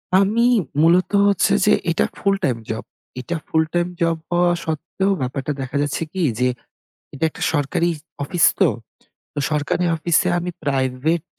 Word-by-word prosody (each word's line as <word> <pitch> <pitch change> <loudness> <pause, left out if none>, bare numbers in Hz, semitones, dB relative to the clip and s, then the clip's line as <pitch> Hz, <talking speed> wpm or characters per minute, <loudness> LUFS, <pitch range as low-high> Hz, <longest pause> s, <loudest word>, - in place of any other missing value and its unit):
আমি 205 +5 +3 0.4
মূলত 175 +4 +4 0.2
হচ্ছে 200 0 +3
যে 210 - +5 0.2
এটা 165 - +1
ফুলটাইম 195 -11 0
জব। 110 - -4 0.4
এটা 170 +6 -4
ফুলটাইম 165 +2 +1
জব 165 -1 +2
হওয়া 175 0 +3
সত্ত্বেও 165 +5 -1
ব্যাপারটা 135 +3 -3
দেখা 130 0 -6
যাচ্ছে 145 +2 -2
কি 190 - -3 0.2
যে? 125 0 +3 0.6
এটা 140 +3 -5
একটা - - -13
সরকারি 155 +3 +1 0.3
অফিস 170 +3 +2
তো। - - +5 0.6
তো - - -3
সরকারে 150 +4 0
অফিসে 170 +2 +2
আমি 175 +1 -4
প্রাইভেট 135 +4 0
165 Hz, 140 wpm, -21 LUFS, 140-180 Hz, 0.6 s, যে